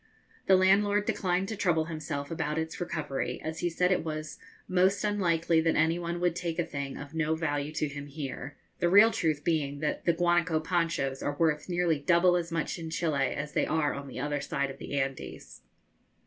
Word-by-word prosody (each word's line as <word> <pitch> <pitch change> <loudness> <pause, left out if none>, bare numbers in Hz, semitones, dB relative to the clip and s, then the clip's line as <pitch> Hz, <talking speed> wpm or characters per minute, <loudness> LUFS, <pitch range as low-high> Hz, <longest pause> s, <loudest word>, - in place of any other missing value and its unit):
The 190 - +7
landlord 200 +2 +4
declined 185 -1 0
to 220 - -3
trouble 175 -5 +1
himself 155 -3 -5
about 150 -1 -2
its 160 +1 -3
recovery, 150 -5 -3
as 160 +1 -4
he 175 - 0
said 180 +2 +1
it 185 - +2
was 155 -1 -5 0.3
'most 190 +2 +2
unlikely 170 -5 +2
that 165 0 +1
any 160 +2 +2
one 170 0 -3
would 175 -1 +1
take 170 -2 -3
a 175 - +1
thing 140 -1 -5
of 145 +1 -9
no 160 -1 0
value 145 -2 -2
to 155 -1 0
him 145 0 -7
here;' 140 -1 -6 0.2
the 175 - +2
real 205 +5 +7
truth 160 -9 0
being 150 -4 0
that 150 - -2
the 170 - +4
guanaco 175 -1 +2
ponchos 165 -5 -1
are 145 0 -2
worth 155 0 +1
nearly 175 -3 +1
double 170 +4 +4
as 170 -1 -2
much 165 +1 -2
in 165 -1 -5
Chili 155 -4 0
as 145 +1 -4
they - - +1
are 155 -2 +1
on 140 0 -6
the 130 - -7
other 145 +1 -1
side 140 0 -2
of 135 - -12
the 140 - -3
Andes. 135 -1 -5
160 Hz, 205 wpm, -29 LUFS, 145-175 Hz, 0.3 s, The